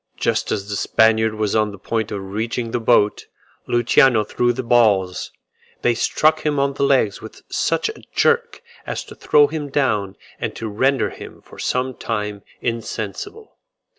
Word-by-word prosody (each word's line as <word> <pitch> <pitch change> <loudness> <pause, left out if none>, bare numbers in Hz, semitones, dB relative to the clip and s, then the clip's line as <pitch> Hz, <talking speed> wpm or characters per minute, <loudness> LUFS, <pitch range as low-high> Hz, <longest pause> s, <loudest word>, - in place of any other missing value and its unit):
Just - - 0
as 100 -1 -2
the 105 - -3
Spaniard 110 +1 +3
was 105 -1 -1
on 110 -1 +2
the 100 - -10
point 110 +2 -3
of 100 - -3
reaching 115 +2 -3
the 120 - -1
boat, 110 -2 +2 0.4
Luciano 120 0 +4
threw 120 +3 0
the 130 +2 -4
balls: 105 -7 +2 0.5
they 120 - +4
struck 155 +6 +2
him 150 -1 0
on 140 0 +1
the 140 - -6
legs 135 -7 +2
with 110 - -12
such - - 0
a 440 - -7
jerk, 475 0 +1 0.2
as - - -3
to - - -12
throw 150 -1 +4
him 150 -1 -4
down 105 -9 0 0.2
and - - -3
to 115 - -5
render 130 +6 +1
him - - -11
for - - -15
some 130 +1 -1
time 105 -4 -4 0.2
insensible. 115 - -5
115 Hz, 165 wpm, -20 LUFS, 105-135 Hz, 0.5 s, Luciano